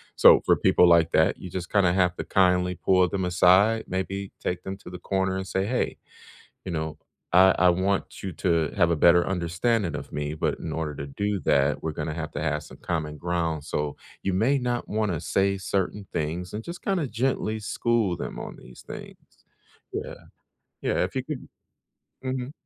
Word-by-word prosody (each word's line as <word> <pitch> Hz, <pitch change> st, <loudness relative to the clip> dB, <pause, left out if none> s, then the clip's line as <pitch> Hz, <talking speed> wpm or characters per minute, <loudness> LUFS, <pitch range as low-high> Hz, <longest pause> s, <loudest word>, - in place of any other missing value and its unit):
So -, -, +8 dB
for -, -, +5 dB
people 90 Hz, -, +4 dB
like 85 Hz, -1 st, +5 dB
that, 80 Hz, +4 st, +3 dB
you 95 Hz, -, -8 dB
just 90 Hz, 0 st, -5 dB
kinda 95 Hz, -4 st, +3 dB
have 90 Hz, -1 st, +2 dB
to -, -, -3 dB
kindly 90 Hz, -1 st, +2 dB
pull 95 Hz, 0 st, +3 dB
them 95 Hz, +2 st, -2 dB
aside, 95 Hz, +5 st, +4 dB
maybe 95 Hz, +1 st, -3 dB
take 90 Hz, 0 st, -3 dB
them 95 Hz, -, -5 dB
to 95 Hz, -, -12 dB
the 90 Hz, -, -7 dB
corner 95 Hz, 0 st, -1 dB
and 95 Hz, -, -4 dB
say, 95 Hz, 0 st, -1 dB
"Hey," 125 Hz, +1 st, -1 dB, 0.7 s
you 95 Hz, -, -4 dB
know, 80 Hz, -1 st, -3 dB, 0.3 s
"I 95 Hz, +2 st, +6 dB
I 90 Hz, -, +5 dB
want 95 Hz, +3 st, 0 dB
you 95 Hz, -2 st, -4 dB
to 80 Hz, -1 st, +1 dB
have 85 Hz, -4 st, +3 dB
a 85 Hz, -, +1 dB
better 85 Hz, +2 st, +5 dB
understanding 90 Hz, +3 st, 0 dB
of -, -, -7 dB
me, 75 Hz, 0 st, -3 dB
but 80 Hz, -, -1 dB
in 80 Hz, -, -5 dB
order 80 Hz, -2 st, -3 dB
to 70 Hz, -, -6 dB
do 100 Hz, +8 st, -2 dB
that, 70 Hz, +1 st, +2 dB
we're 80 Hz, -, -3 dB
gonna 75 Hz, 0 st, -3 dB
have 80 Hz, -1 st, -5 dB
to -, -, -3 dB
have -, -, -1 dB
some -, -, -12 dB
common 80 Hz, -3 st, -3 dB
ground, 85 Hz, -2 st, -2 dB
so 75 Hz, -1 st, -3 dB, 0.3 s
you 95 Hz, -, -1 dB
may 115 Hz, +9 st, +3 dB
not 125 Hz, -2 st, -2 dB
wanna 105 Hz, -7 st, -1 dB
say 100 Hz, +2 st, +1 dB
certain 95 Hz, +1 st, -2 dB
things," 85 Hz, +4 st, -3 dB
and 105 Hz, -, -3 dB
just 170 Hz, +1 st, -8 dB
kinda 185 Hz, -7 st, 0 dB
gently 115 Hz, -2 st, -1 dB
school 110 Hz, -3 st, 0 dB
them -, -, -5 dB
on -, -, -7 dB
these 60 Hz, -, -14 dB
things. -, -, -12 dB, 0.5 s
Yeah. -, -, -4 dB, 0.7 s
Yeah, -, -, +1 dB
if -, -, -6 dB
you -, -, -1 dB
could -, -, -6 dB, 0.8 s
Mhm. 130 Hz, 0 st, -3 dB
90 Hz, 195 wpm, -26 LUFS, 85-100 Hz, 0.8 s, So